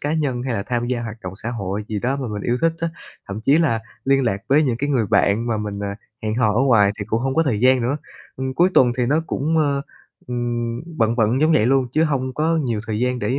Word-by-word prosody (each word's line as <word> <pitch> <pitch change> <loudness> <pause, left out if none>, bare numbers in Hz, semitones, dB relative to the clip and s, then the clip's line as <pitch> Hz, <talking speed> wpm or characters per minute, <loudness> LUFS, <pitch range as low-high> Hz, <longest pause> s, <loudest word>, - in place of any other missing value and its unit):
cá 145 +2 -1
nhân 135 -6 -1
hay 125 -3 -2
là 100 - -2
tham 120 +1 -2
gia 120 -1 -1
hoạt 110 0 -6
động 90 0 -5
xã 115 +3 -4
hội 105 -3 -3
gì 105 -1 -2
đó 130 +6 -1
mà 125 - -3
mình 105 -1 -5
yêu 120 +1 0
thích 165 0 +3
á. 165 - 0 0.4
Thậm 100 +2 -5
chí 140 +7 +4
là 115 -9 +2 0.2
liên 135 0 +3
lạc 100 -3 -1
với 145 +3 +5
những 125 -5 0
cái 145 +3 -2
người 120 -6 +1
bạn 105 +4 +2
mà 115 -2 0
mình, 105 -1 -4
à, 100 0 -3 0.3
hẹn 110 0 -1
hò 115 -4 +2
ở 115 - +1
ngoài 110 -7 +4
thì 100 - -3
cũng 110 +2 -1
hông 135 +1 -1
có 165 - +4
thời 115 -8 0
gian 130 -1 +4
nữa. 130 +5 0 0.4
Ừm, 130 0 -3
cuối 175 +4 +4
tuần 120 -2 +5
thì 125 -2 +1
nó 145 +4 +2
cũng, 160 +4 -1
ơ, 140 -2 +1 0.4
ừm, 120 -1 -2 0.2
bận 115 +1 +2
bận 115 +4 +2
giống 155 +1 +4
vậy 120 -8 +4
luôn 135 0 +3
chứ 160 +1 +3
hông 130 -4 -1
có 160 +2 +1
nhiều 120 -8 -1
thời 110 -1 -2
gian 125 +1 0
để, 130 +3 -1
125 Hz, 275 wpm, -21 LUFS, 110-135 Hz, 0.4 s, với